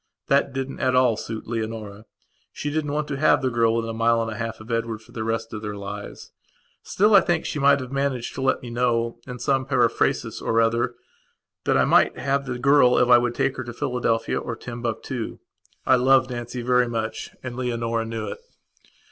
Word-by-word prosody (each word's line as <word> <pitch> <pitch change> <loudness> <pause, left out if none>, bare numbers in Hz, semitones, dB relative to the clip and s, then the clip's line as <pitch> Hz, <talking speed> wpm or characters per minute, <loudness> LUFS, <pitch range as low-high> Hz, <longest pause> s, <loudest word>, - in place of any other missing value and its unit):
That 140 0 +3
didn't 135 +1 -4
at 130 -1 +1
all 125 -3 +4
suit 110 +1 -6
Leonora. 110 -2 -5 0.5
She 145 - -4
didn't 150 -1 -1
want 150 0 -1
to 140 - -2
have 145 -1 +3
the 130 - +1
girl 115 -1 +2
within 115 -1 -1
a - - -6
mile 115 +1 +2
and 115 -1 -2
a - - -5
half 115 -1 -4
of 110 +2 -9
Edward 115 -1 -1
for - - -19
the 110 - -4
rest 115 +1 -3
of 110 - -5
their 105 -1 -5
lives. 100 0 -8 0.5
Still, 210 +3 +2
I 195 - +9
think 170 -1 0
she 150 - -3
might 140 0 +5
have 130 -1 -7
managed 135 -3 -2
to 130 - -5
let 135 - +1
me 120 - -7
know, 115 -1 0
in 125 -1 -6
some 130 +2 +1
periphrasis 135 0 +1
or 115 - +1
other, 115 +1 +1 0.7
that - - +3
I - - +4
might - - +4
have 140 -1 -1
the 125 -1 -3
girl 140 -1 +5
if 125 - +3
I 120 -1 +8
would 120 0 -1
take 135 - 0
her 130 - -3
to 120 -1 -7
Philadelphia 120 -4 -1
or 115 - -5
Timbuctoo. 120 0 -5 0.5
I 130 - +5
loved 130 0 +4
Nancy 120 0 -5
very 125 0 +3
muchand 115 +2 -5
Leonora 115 -2 -1
knew 115 -1 -4
it. - - -6
120 Hz, 205 wpm, -24 LUFS, 115-130 Hz, 0.7 s, I